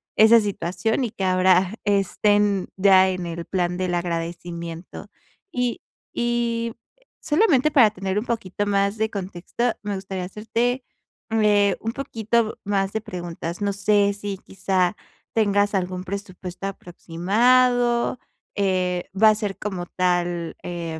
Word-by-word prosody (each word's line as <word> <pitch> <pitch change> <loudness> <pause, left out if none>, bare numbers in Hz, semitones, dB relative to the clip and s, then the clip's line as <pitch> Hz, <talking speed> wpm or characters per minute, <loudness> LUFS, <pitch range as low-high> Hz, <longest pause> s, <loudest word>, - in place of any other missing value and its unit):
esa 220 +2 +7
situación, 205 +3 -1
y 235 - -1
que 195 - -5
ahora 185 +1 +3
estén 205 0 +2
ya 190 -1 +6
en 185 -1 -3
el 170 0 -5
plan 180 -1 -1
del 180 -1 -1
agradecimiento. 170 0 -5 0.4
Y 245 -1 -1 0.3
y 235 -1 -1 0.5
solamente 305 - +3
para 240 -7 +6
tener 195 0 -2
un 215 - -5
poquito 205 -3 -2
más 200 +1 +1
de 220 0 +1
contexto 200 +5 -3
me 205 -1 -3
gustaría 190 -1 -5
hacerte, 235 +6 -1 0.5
eh, 205 -3 +3
un 225 +1 -3
poquito 230 -4 -1
más 195 -1 0
de 220 - -1
preguntas. 175 -4 -6
No 200 -1 0
sé, 200 0 +2
si 200 -1 -5
quizá 190 -1 -1 0.4
tengas 205 -2 +2
algún 185 -1 -2
presupuesto 185 -1 -6
aproximado, 235 +8 +1 0.4
eh, 185 -3 0
va 220 0 +8
a 215 - +4
ser 210 -2 -3
como 185 -4 -4
tal, 175 -2 -1
eh, 170 -2 -5
200 Hz, 130 wpm, -23 LUFS, 180-220 Hz, 0.5 s, va